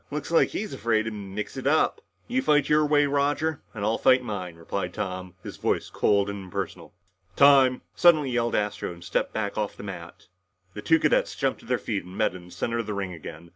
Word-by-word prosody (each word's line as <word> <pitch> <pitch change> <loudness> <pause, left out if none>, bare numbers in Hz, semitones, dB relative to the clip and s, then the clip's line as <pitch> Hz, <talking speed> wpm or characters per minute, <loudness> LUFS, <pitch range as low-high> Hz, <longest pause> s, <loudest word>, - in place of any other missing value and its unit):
"Looks 150 +1 -5
like 165 - +4
he's 215 0 -4
afraid 110 -2 +1
to 110 - -4
mix 105 +1 -6
it 130 - -3
up!" 155 - +2 0.3
"You 255 +2 0
fight 150 - +2
your 150 0 +4
way, 145 0 +4
Roger, 145 +2 0
and 105 -2 -4
I'll 110 +1 +1
fight 130 0 +4
mine," 95 -7 -5
replied 90 +2 -4
Tom, 95 -3 -5
his - - -8
voice - - -1
cold 100 -1 +2
and 100 -1 -5
impersonal. 90 - -6 0.4
"Time!" 135 -2 +5
suddenly 155 -6 +4
yelled 120 -1 0
Astro 105 -3 -1
and 85 0 -11
stepped 85 - -1
back 110 -1 -3
off 105 -1 -3
the - - -9
mat. 90 -4 -9 0.5
The 105 - -7
two 160 +9 +4
cadets 150 - +2
jumped 135 -2 -1
to - - -16
their 125 0 +1
feet 105 -5 -3
and 90 +1 -11
met 110 -5 +1
in 90 -1 -10
the 90 - -15
center 115 +6 -2
of 115 - -3
the 105 - -3
ring 95 -2 -3
again. 80 0 -10
110 Hz, 220 wpm, -26 LUFS, 95-140 Hz, 0.5 s, Time